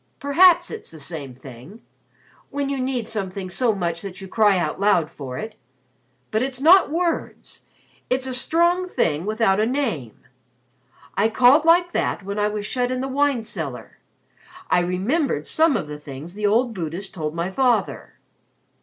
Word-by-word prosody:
"Perhaps 345 Hz, +5 st, +4 dB
it's 445 Hz, -, -8 dB
the 160 Hz, -, -11 dB
same 140 Hz, -4 st, -7 dB
thing 130 Hz, -, -13 dB, 0.7 s
when 280 Hz, -1 st, -3 dB
you 275 Hz, -1 st, -2 dB
need 255 Hz, -3 st, -2 dB
something 195 Hz, -3 st, -4 dB
so 230 Hz, +2 st, +1 dB
much 170 Hz, -3 st, -2 dB
that 195 Hz, -1 st, -8 dB
you 195 Hz, -, -8 dB
cry 205 Hz, -1 st, +3 dB
out 170 Hz, -2 st, -2 dB
loud 180 Hz, -6 st, +2 dB
for 130 Hz, -5 st, -7 dB
it. 220 Hz, 0 st, -7 dB, 0.7 s
But 220 Hz, -, +1 dB
it's 260 Hz, 0 st, -3 dB
not 345 Hz, +6 st, +6 dB
words, 335 Hz, +2 st, -3 dB, 0.5 s
it's 260 Hz, +1 st, 0 dB
a 260 Hz, -, -3 dB
strong 345 Hz, +7 st, +3 dB
thing 170 Hz, -, -1 dB
without 215 Hz, -2 st, +2 dB
a 215 Hz, -, +3 dB
name. 225 Hz, -, -2 dB, 1.0 s
I 215 Hz, +3 st, +2 dB
called 255 Hz, +7 st, +5 dB
like 345 Hz, +1 st, +4 dB
that 205 Hz, -, -1 dB
when 200 Hz, +2 st, -4 dB
I 210 Hz, -, +2 dB
was 210 Hz, -1 st, -4 dB
shut 245 Hz, +2 st, -1 dB
in 255 Hz, 0 st, -2 dB
the 265 Hz, -, -2 dB
wine 275 Hz, -3 st, +1 dB
cellar. 140 Hz, -, -7 dB, 0.7 s
I -, -, +5 dB
remembered 185 Hz, -, -1 dB
some 315 Hz, -5 st, +2 dB
of 170 Hz, -, -5 dB
the 150 Hz, 0 st, -7 dB
things 145 Hz, +3 st, -9 dB
the 210 Hz, +1 st, -1 dB
old 235 Hz, +3 st, +2 dB
Buddhist 180 Hz, +1 st, -5 dB
told 155 Hz, -3 st, -4 dB
my 170 Hz, +3 st, -2 dB
father." 250 Hz, +2 st, 0 dB
215 Hz, 170 wpm, -22 LUFS, 175-270 Hz, 1.0 s, not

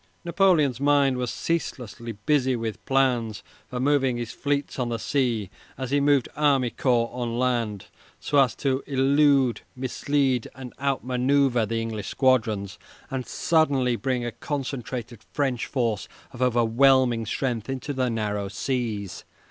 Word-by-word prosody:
Napoleon's 170 Hz, -, +3 dB
mind 140 Hz, -2 st, +3 dB
was 125 Hz, -1 st, -2 dB
ceaselessly 120 Hz, -8 st, -3 dB
busy 130 Hz, +5 st, +1 dB
with 115 Hz, -2 st, -4 dB
plans 125 Hz, -5 st, +1 dB, 0.2 s
for 125 Hz, -, -5 dB
moving 135 Hz, -2 st, +2 dB
his 120 Hz, -1 st, -4 dB
fleets 145 Hz, -1 st, -2 dB
on 125 Hz, -1 st, -1 dB
the 115 Hz, -, -1 dB
sea 115 Hz, -6 st, -1 dB, 0.3 s
as 130 Hz, -1 st, -4 dB
he 145 Hz, -, +3 dB
moved 140 Hz, -3 st, +3 dB
army 140 Hz, -5 st, +2 dB
corps 120 Hz, -3 st, +1 dB
on 120 Hz, -2 st, -3 dB
land, 120 Hz, -6 st, -1 dB, 0.3 s
so 145 Hz, -, +1 dB
as 130 Hz, -3 st, +3 dB
to 135 Hz, -1 st, 0 dB
elude, 135 Hz, -2 st, +3 dB
mislead, 130 Hz, 0 st, 0 dB
and 130 Hz, -2 st, -9 dB
out 135 Hz, -2 st, -1 dB
manoeuvre 125 Hz, -2 st, +2 dB
the 115 Hz, +1 st, -1 dB
English 110 Hz, -3 st, -4 dB
squadrons, 110 Hz, -7 st, +1 dB, 0.3 s
and 130 Hz, -2 st, -3 dB
suddenly 140 Hz, -7 st, +2 dB
bring 125 Hz, 0 st, -1 dB
a 120 Hz, -, -2 dB
concentrated 125 Hz, -5 st, -5 dB
French 130 Hz, -5 st, -1 dB
force 115 Hz, -6 st, -1 dB, 0.2 s
of 125 Hz, -, -10 dB
overwhelming 120 Hz, 0 st, +3 dB
strength 120 Hz, -1 st, -2 dB
into 135 Hz, +2 st, -3 dB
the 130 Hz, -2 st, 0 dB
narrow 105 Hz, -3 st, -2 dB
seas. 105 Hz, -2 st, -3 dB
125 Hz, 140 wpm, -25 LUFS, 115-140 Hz, 0.3 s, Napoleon's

